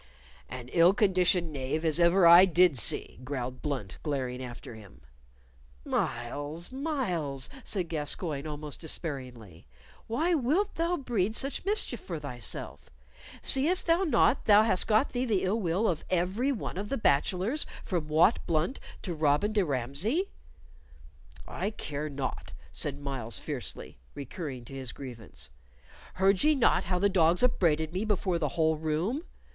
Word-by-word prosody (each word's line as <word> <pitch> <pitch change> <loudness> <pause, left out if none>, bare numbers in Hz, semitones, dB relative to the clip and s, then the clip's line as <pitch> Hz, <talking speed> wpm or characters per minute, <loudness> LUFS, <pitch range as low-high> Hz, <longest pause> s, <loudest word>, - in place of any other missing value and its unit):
"An 125 -1 -7
ill 175 +5 +5
conditioned 180 -5 +2
knave 140 +4 -2
as 160 +1 +2
ever 170 +2 +5
I 170 +2 +10
did 180 -3 +4
see," 115 - 0
growled 130 -2 -4
Blunt, 130 -11 -4
glaring 130 -4 -3
after 120 -1 -8
him. 105 -3 -14 0.8
"Myles, 145 - -3
Myles," 185 - -2
said 185 -5 -1
Gascoyne, 155 -1 -2
almost 150 -1 -6
despairingly, 125 - -6 0.4
"why 315 +10 +1
wilt 320 +8 +1
thou 340 +2 0
breed 225 - -1
such 275 +7 -2
mischief 400 - 0
for 170 -5 -6
thyself? 120 -7 -6 0.5
Seest 315 +8 +2
thou 335 +3 +3
not 275 -4 +3
thou 210 0 +7
hast 190 -5 +1
got 220 +5 +3
thee 245 0 -1
the 220 -7 +1
ill 195 +4 +1
will 190 +3 +1
of 165 -4 -1
every 190 +10 +1
one 215 -7 -4
of 205 +1 -5
the 275 - -1
bachelors, 190 - +1 0.2
from 170 -5 -2
Wat 160 +8 +4
Blunt 165 - 0 0.2
to 180 - -3
Robin 155 +6 +1
de 205 -2 +3
Ramsey?" 150 - -1 1.2
"I - - -3
care 150 -7 -5
not," 130 - -5 0.2
said - - -3
Myles, 135 -6 -4
fiercely, - - -6 0.2
recurring 140 -3 -6
to 135 - -11
his 130 -3 -5
grievance. 120 -6 -8 0.6
"Heard 190 +1 +3
ye 305 0 +5
not 260 - +3
how 180 +1 0
the 200 +3 +3
dogs 180 0 +3
upbraided 160 -9 +2
me 185 +3 -1
before 190 -5 0
the 150 -3 0
whole 160 -1 +3
room? 165 - -1
170 Hz, 150 wpm, -29 LUFS, 140-215 Hz, 1.2 s, I